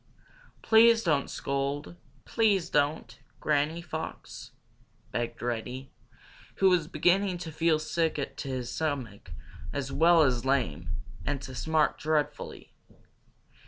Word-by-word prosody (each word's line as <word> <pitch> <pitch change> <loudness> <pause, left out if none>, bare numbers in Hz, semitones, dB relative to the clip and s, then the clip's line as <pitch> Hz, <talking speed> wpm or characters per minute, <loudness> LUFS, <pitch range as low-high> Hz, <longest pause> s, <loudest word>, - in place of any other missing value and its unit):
"Please 230 0 +6
don't 150 -5 +1
scold, 140 -8 -3 0.3
please 205 -6 +1
don't, 145 +2 0 0.2
Granny 155 +3 0
Fox," 160 -1 -7 0.6
begged 120 0 -3
Reddy, 125 +3 -4 0.6
who 190 -1 +4
was 170 -4 +2
beginning 185 +2 +2
to 170 -2 -7
feel 160 0 +2
sick 160 +1 -1 0.2
to - - -6
his 125 -2 -3
stomach 130 - -3 0.4
as 135 -2 -3
well 165 0 +5
as 125 -4 +1
lame, 105 - 0 0.3
and 140 -1 -2
to 130 - -8
smart 155 +3 +1
dreadfully. 155 -1 -2
150 Hz, 115 wpm, -28 LUFS, 130-170 Hz, 0.6 s, Please